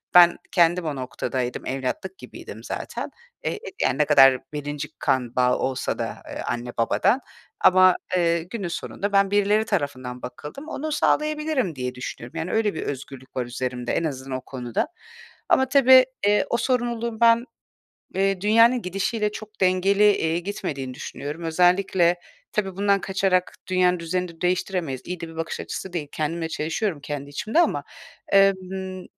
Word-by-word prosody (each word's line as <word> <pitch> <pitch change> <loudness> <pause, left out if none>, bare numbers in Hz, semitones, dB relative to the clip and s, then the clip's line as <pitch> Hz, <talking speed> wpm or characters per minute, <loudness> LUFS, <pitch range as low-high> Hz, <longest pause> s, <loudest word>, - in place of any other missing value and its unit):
ben 175 -1 +8
kendim 175 0 +3
o 150 -2 -2
noktadaydım, 130 -1 -3
evlatlık 135 +8 -3
gibiydim - - -10
zaten, - - -5 0.3
eee, - - -2 0.4
ne 150 +2 +2
kadar 135 -3 +7 0.2
1'inci 145 0 -4
kan 125 -2 0
bağı 125 0 +3
olsa 130 -1 -2
da, - - -3
eee, - - -5
anne 120 +1 -3
babadan 195 - +2 0.4
ama, 185 0 +6 0.2
eee, 170 -1 +2
günün 195 +2 -5
sonunda 200 +4 -4
ben 195 0 +4
birileri 205 +2 +3
tarafından 130 - -3
bakıldım, 150 - -8
onu 310 +1 -4
sağlayabilirim 300 - +1
diye 125 -1 -4
düşünüyorum. 125 +3 -7
Yani, 160 +2 -3
öyle 220 -3 +1
bir - - -4
özgürlük 135 -1 -7
var 125 - -1
üzerimde 125 0 -3
en - - 0
azından 135 -4 -3
o - - -8
konuda 125 - -3 0.6
ama 265 0 +4
tabii, 260 -2 +7 0.2
eee, 210 0 +3
o 235 - +1
sorumluluğun 235 -3 -1
ben, 230 +1 +5 0.7
eee, 195 0 +1
dünyanın 230 +4 +5
gidişiyle 210 +3 -1
çok 215 -1 -10
dengeli, 190 +2 +3
eee, 160 +1 0
gitmediğini 140 -8 -4
düşünüyorum. 145 +5 -6
Özellikle 175 +1 +3 0.4
tabii 195 -3 -1
bundan 200 0 +2
kaçarak 190 -2 0
dünyanın 180 -1 +2
düzenini 170 0 -3
değiştiremeyiz. 180 -6 -1
İyi 180 -1 -5
de 165 - -5
bir 165 - -12
bakış 165 0 -3
açısı 190 - -6
değil. 160 -5 -3
Kendimle 160 +2 -2
çelişiyorum, 165 +2 -2
kendi 140 0 -6
içimde 215 - +1
ama, - - +1 0.5
emm, 190 -1 +2
180 Hz, 150 wpm, -24 LUFS, 140-200 Hz, 0.7 s, ben